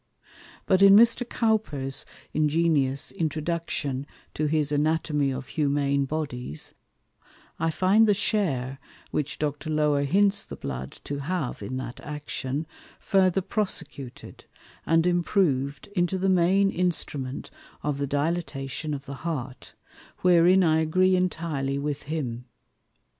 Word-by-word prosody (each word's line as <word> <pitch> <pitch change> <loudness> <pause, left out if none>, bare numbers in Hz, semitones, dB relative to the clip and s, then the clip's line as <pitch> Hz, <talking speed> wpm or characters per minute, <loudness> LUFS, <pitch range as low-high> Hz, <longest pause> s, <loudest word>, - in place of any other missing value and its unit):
But 190 -1 +3
in 195 0 +9
Mr. 235 +2 +5
Cowper's 180 - 0 0.3
ingenious 150 -3 +1
Introduction 155 -3 -2 0.3
to 155 - 0
his 150 -1 +1
Anatomy 150 -1 +1
of 130 0 -5
Humane 140 -2 +1
Bodies, 130 - -4 0.9
I 165 - +1
find 190 +7 +4
the 205 - +4
Share 140 - -1 0.3
which 150 -1 -2
Dr. 150 +1 -3
Lower 150 -2 +2
hints 195 +8 +2
the - - -8
Blood 65 -1 -5
to 140 0 -4
have 150 -2 -3
in 130 - -4
that 130 -2 -6
Action, 150 0 -4 0.3
further 190 -2 +2
prosecuted, 160 - -5 0.4
and 165 +1 +4
improved 170 -6 +1
into 175 +1 +1
the 190 +1 +1
main 190 +2 +4
Instrument 150 -7 -2 0.3
of 145 -1 -1
the 140 - -1
Dilatation 145 -1 -2
of 140 0 -8
the 140 -1 -7
Heart, 135 -6 -5 0.5
wherein 180 +1 +6
I 160 -2 +3
agree 185 +4 +3
intirely 160 -7 -1
with 145 0 -3
him. 125 -6 -3
155 Hz, 120 wpm, -26 LUFS, 140-180 Hz, 0.9 s, in